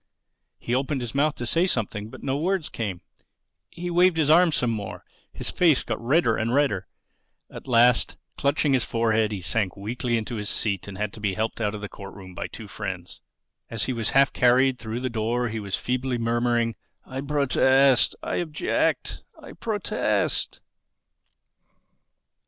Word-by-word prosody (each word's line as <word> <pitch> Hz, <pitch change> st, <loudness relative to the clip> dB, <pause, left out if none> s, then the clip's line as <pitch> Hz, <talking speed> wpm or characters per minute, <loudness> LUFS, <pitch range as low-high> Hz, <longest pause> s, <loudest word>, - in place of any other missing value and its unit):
He 120 Hz, -, -4 dB
opened 135 Hz, +1 st, 0 dB
his 120 Hz, -2 st, -5 dB
mouth 145 Hz, +2 st, +2 dB
to 120 Hz, -, -5 dB
say 165 Hz, +10 st, +2 dB
something; 105 Hz, -, -2 dB
but -, -, -12 dB
no 135 Hz, -1 st, 0 dB
words 175 Hz, +2 st, 0 dB
came. 95 Hz, -6 st, -4 dB, 0.7 s
He 175 Hz, +1 st, -5 dB
waved 175 Hz, 0 st, +4 dB
his 155 Hz, -2 st, +3 dB
arms 170 Hz, -1 st, +5 dB
some 120 Hz, -2 st, +1 dB
more. 105 Hz, -3 st, -5 dB, 0.3 s
His -, -, -2 dB
face 165 Hz, -7 st, +4 dB
got -, -, -4 dB
redder 130 Hz, -2 st, +3 dB
and 115 Hz, +3 st, 0 dB
redder. 135 Hz, -10 st, +1 dB, 0.6 s
At -, -, -10 dB
last, 120 Hz, -1 st, +4 dB, 0.2 s
clutching 140 Hz, 0 st, +1 dB
his 130 Hz, -3 st, +3 dB
forehead, 110 Hz, -2 st, +1 dB
he 100 Hz, -3 st, -4 dB
sank 95 Hz, +1 st, 0 dB
weakly 120 Hz, +4 st, -2 dB
into 115 Hz, +1 st, -4 dB
his 105 Hz, -1 st, -3 dB
seat 100 Hz, -4 st, 0 dB
and 100 Hz, -1 st, -8 dB
had 105 Hz, 0 st, -2 dB
to -, -, -9 dB
be 100 Hz, -3 st, -1 dB
helped 110 Hz, +3 st, -2 dB
out 105 Hz, -1 st, 0 dB
of 105 Hz, -, -7 dB
the 105 Hz, -, -4 dB
court 100 Hz, 0 st, -10 dB
room 95 Hz, -2 st, -11 dB
by -, -, -4 dB
two 110 Hz, -, -10 dB
friends. 95 Hz, -4 st, -6 dB, 0.5 s
As 110 Hz, -3 st, -2 dB
he 130 Hz, -, -1 dB
was 115 Hz, -3 st, -1 dB
half 135 Hz, 0 st, +5 dB
carried 125 Hz, +1 st, +3 dB
through 115 Hz, +2 st, -4 dB
the 130 Hz, -, -1 dB
door 120 Hz, +1 st, -1 dB
he 110 Hz, 0 st, -4 dB
was 100 Hz, -2 st, -2 dB
still -, -, -8 dB
feebly 125 Hz, 0 st, -1 dB
murmuring, 120 Hz, 0 st, +1 dB, 0.3 s
"I 130 Hz, 0 st, -5 dB
protest—I 140 Hz, -2 st, +3 dB
object—I 155 Hz, -3 st, -2 dB
protest!" 220 Hz, -4 st, -1 dB
120 Hz, 170 wpm, -25 LUFS, 110-140 Hz, 0.7 s, arms